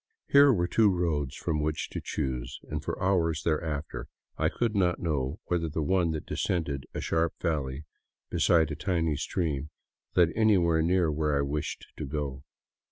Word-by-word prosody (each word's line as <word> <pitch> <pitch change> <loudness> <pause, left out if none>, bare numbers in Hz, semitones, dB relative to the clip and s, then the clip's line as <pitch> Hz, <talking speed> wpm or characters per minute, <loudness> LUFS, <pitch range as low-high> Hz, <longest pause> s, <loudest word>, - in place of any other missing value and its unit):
Here 140 0 +7
were 85 -7 +1
two 105 +4 +4
roads 85 -7 0
from 80 -3 -1
which 75 +1 -1
to - - -4
choose, 60 -2 -3
and - - -4
for - - -4
hours 85 -4 +1
there 80 0 +1
after 75 -2 -4 0.3
I - - +1
could 115 -3 -1
not 90 -3 +2
know 75 0 -1
whether 85 -2 0
the 80 +1 -2
one 90 +1 +2
that 80 - -4
descended 70 -8 -2
a - - -2
sharp 80 0 0
valley 75 -4 -2 0.5
beside 80 -2 +3
a - - -2
tiny 80 -1 0
stream 75 -2 -2 0.5
led 85 -2 +5
anywhere 90 -7 +4
near 85 -1 +2
where 75 -1 +1
I - - +2
wished 70 +1 -3
to - - -4
go. 70 -2 -4
80 Hz, 170 wpm, -28 LUFS, 75-90 Hz, 0.5 s, Here